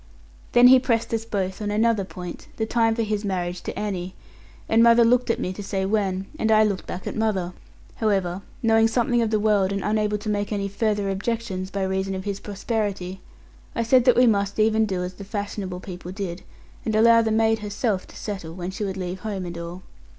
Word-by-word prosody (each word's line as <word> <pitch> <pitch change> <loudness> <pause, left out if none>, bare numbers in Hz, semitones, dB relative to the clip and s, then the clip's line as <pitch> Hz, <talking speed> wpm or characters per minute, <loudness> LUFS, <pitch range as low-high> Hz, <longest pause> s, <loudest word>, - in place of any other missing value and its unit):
Then 245 +1 +8
he 260 0 +8
pressed 230 -2 0
us 225 0 -1
both 195 -3 -3
on 210 - -2
another 215 0 +2
point, 180 -2 -8
the 220 - 0
time 225 0 +2
for 230 - 0
his 210 -1 -2
marriage 180 -3 -2
to - - -5
Annie; 190 -3 -3 0.5
and 225 +1 +4
mother 235 0 +6
looked 250 +1 +3
at 230 - +1
me 185 - -2
to 205 - -7
say 195 -1 -2
when, 195 -2 0
and 220 - +1
I 215 0 +6
looked 200 -3 -1
back 185 - -6
at - - -4
mother. 195 -5 -1 0.4
However, 195 -4 0 0.2
knowing 225 0 +5
something 240 +1 +1
of 225 - +1
the 215 -1 +1
world, 205 -2 +2
and 200 -1 -2
unable 210 0 +1
to 210 +1 -9
make 205 0 -1
any 200 -1 -1
further 205 -1 0
objection, 195 -2 -3
by 195 -1 -2
reason 190 0 -1
of 190 - -5
his 200 0 -3
prosperity, 200 -3 -3 0.5
I 230 - +1
said 250 +1 +4
that 250 - +5
we 250 - +6
must 200 -3 +1
even 220 0 +3
do 185 -3 -2
as 180 +1 -5
the 200 - -10
fashionable 200 -2 -4
people 180 -2 -8
did, 185 -2 -5 0.4
and 220 - -1
allow 230 +1 +6
the 225 - 0
maid 220 0 +2
herself 205 -1 -2
to - - -15
settle, 185 -6 -6
when 180 0 -4
she 195 - -4
would 195 -1 -3
leave 185 0 -4
home 200 -3 -4
and 175 -1 -6
all. 170 +2 -7
205 Hz, 215 wpm, -24 LUFS, 190-225 Hz, 0.5 s, Then